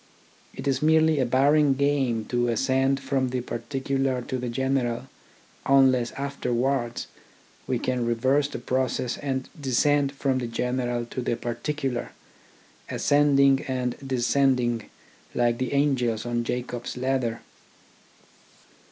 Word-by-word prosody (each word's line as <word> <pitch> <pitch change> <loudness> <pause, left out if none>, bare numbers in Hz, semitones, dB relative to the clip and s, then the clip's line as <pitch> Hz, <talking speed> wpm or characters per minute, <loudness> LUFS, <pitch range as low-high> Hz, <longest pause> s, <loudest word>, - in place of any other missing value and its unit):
It - - -6
is 135 0 +1
merely 160 0 +4
a 130 - +2
barren 140 +3 +4
game 135 -5 +1
to 120 +1 0
ascend 135 +3 +1
from 135 -1 -1
the 125 0 -2
parti 120 +3 -5
cular 135 -2 0
to 130 - -2
the 125 0 -3
general, 125 -1 -1 0.6
unless 130 -3 +4
afterwards 130 -3 -1 0.6
we 130 - 0
can 125 +1 -1
reverse 130 +5 +2
the - - -6
process 125 0 -1
and 130 -2 -3
descend 140 +2 +2
from 135 -2 0
the 120 - -3
general 120 0 -2
to 125 - -5
the 120 - -1
particular, 125 +2 -3 0.8
ascending 140 -2 +3
and 125 -2 -1
descending 125 -2 +1 0.5
like 120 -1 +1
the 130 - -2
angels 130 -6 +1
on 120 0 -1
Jacob's 125 0 -4
ladder. 125 -3 -1
130 Hz, 125 wpm, -25 LUFS, 120-135 Hz, 0.8 s, merely